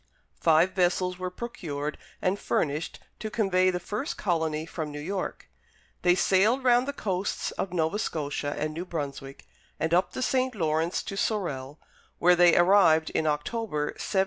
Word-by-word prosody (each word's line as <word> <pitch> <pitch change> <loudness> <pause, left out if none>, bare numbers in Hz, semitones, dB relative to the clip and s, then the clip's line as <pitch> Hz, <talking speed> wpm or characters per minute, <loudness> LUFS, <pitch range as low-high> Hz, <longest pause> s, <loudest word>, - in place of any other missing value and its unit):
Five 165 +3 +4
vessels 180 0 +1
were 185 0 -2
procured 155 -9 -5 0.3
and 190 +2 +1
furnished 150 +2 -1 0.2
to 215 - -4
convey 190 -4 +2
the 180 -1 -1
first 210 - -4
colony 160 -4 -1
from 160 -2 -5
New 145 - -6
York. 185 +5 -4 0.5
They 175 0 +4
sailed 210 +8 +3
round 250 0 +4
the - - 0
coasts 195 -8 -2
of 195 - -4
Nova 170 +3 0
Scotia 145 -5 -2
and 155 +1 -2
New 165 +3 -4
Brunswick, 140 -5 -6 0.3
and 160 +1 0
up 180 +2 +2
the 255 - -2
St. 255 -1 +1
Lawrence 160 -1 0
to 195 - -6
Sorel, 150 -10 -2 0.4
where 180 +1 +5
they 175 -1 +6
arrived 175 -3 +5
in 155 - 0
October, 150 0 -1
1783. 195 - -2
175 Hz, 160 wpm, -27 LUFS, 155-195 Hz, 0.5 s, they